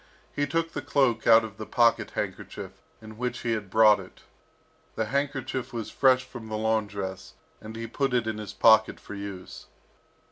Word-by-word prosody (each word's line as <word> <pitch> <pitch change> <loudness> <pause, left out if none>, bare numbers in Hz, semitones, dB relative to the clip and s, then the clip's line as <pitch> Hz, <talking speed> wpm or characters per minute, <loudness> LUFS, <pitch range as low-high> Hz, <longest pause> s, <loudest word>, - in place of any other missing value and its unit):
He 145 0 0
took 165 +3 -1
the - - -3
cloak 125 -6 +1
out 115 0 +7
of 110 -1 -8
the 110 - -6
pocket 120 -1 +2
handkerchief - - -5 0.3
in 110 0 -11
which 125 0 -3
he 115 - -1
had 105 -3 -3
brought 105 0 +6
it. 95 -1 -13 0.7
The 110 - -1
handkerchief 135 0 -2
was 115 -2 -5
fresh 130 -1 +4
from 120 -3 -10
the 110 - -3
laundress, 105 -4 -2 0.3
and 110 +1 -9
he 115 0 -5
put 135 +3 -1
it 120 -2 +1
in 110 -1 -3
his 105 - -6
pocket 110 -1 +4
for - - -10
use. 100 -2 -8
110 Hz, 180 wpm, -27 LUFS, 110-125 Hz, 0.7 s, out